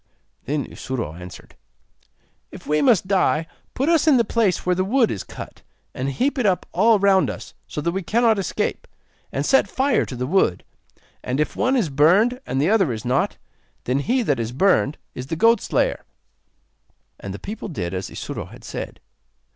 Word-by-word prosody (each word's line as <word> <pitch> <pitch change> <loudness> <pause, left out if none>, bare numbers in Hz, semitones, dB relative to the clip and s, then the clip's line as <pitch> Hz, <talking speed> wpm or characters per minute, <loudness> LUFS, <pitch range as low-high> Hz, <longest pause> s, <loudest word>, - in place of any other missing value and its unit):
Then 145 +1 -1
Isuro 125 - -5
answered: 90 +1 -11 1.0
'If - - -11
we 150 0 +1
must 225 -8 +3
die, 185 -5 +2 0.3
put 275 - 0
us 330 -1 +3
in 290 -4 +6
the 235 - +4
place 215 -5 0
where 180 - +3
the 185 +1 0
wood 230 +4 +2
is 100 - -4
cut, - - -10 0.3
and 130 +2 -2
heap 265 - 0
it 245 - 0
up 185 -2 +1
all 215 +5 +4
round 195 -1 +3
us, - - -7
so 150 - -5
that 170 - 0
we 190 +2 -2
cannot 225 +3 +2
escape, 195 - -2 0.4
and - - -2
set 270 - +4
fire 270 -1 +2
to 130 - -6
the 125 +1 -2
wood; 140 - +1 0.6
and 130 +3 -2
if 150 - -1
one 260 +2 +1
is 220 - +1
burned 190 - +3
and 135 - -1
the 145 - +2
other 195 - +3
is 110 -1 -5
not, 125 +3 0 0.5
then 130 +3 0
he 245 - +1
that 145 - 0
is 115 0 -2
burned 155 0 +2 0.2
is 125 - -7
the 165 - -2
goat 230 +5 +4
slayer.' - - 0 1.2
And 100 - -6
the 100 - -6
people 210 - -7
did 95 - -4
as 95 0 -4
Isuro - - -6
had - - -14
said. - - -6
180 Hz, 190 wpm, -22 LUFS, -, 1.2 s, in